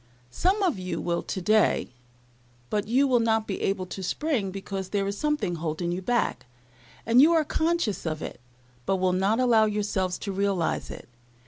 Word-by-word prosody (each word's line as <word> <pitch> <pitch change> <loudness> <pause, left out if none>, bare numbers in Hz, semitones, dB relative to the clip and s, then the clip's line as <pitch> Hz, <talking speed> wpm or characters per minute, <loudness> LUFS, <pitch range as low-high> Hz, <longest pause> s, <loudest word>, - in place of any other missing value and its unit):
Some 385 - +1
of 340 - +1
you 180 -2 -3
will 170 -1 -1
today, 210 -2 +1 0.8
but 205 -1 -1
you 265 +5 +3
will 250 -2 +3
not 225 -1 +1
be 195 - -4
able 195 -1 -1
to 190 - -7
spring, 230 - -1
because 195 0 -5
there 200 -1 0
is 200 0 -2
something 255 - -1
holding 165 +2 -2
you 180 +2 -3
back; 235 - -1 0.6
and 235 +3 +6
you 320 +4 +6
are 320 -2 +3
conscious 320 - 0
of 155 -2 -3
it, - - -7 0.5
but 195 - +2
will 185 -1 +1
not 195 +5 +1
allow 235 -4 +4
yourselves 205 -3 -1
to 200 - -3
realize 195 -3 -1
it. - - -9
200 Hz, 180 wpm, -26 LUFS, 185-245 Hz, 0.8 s, and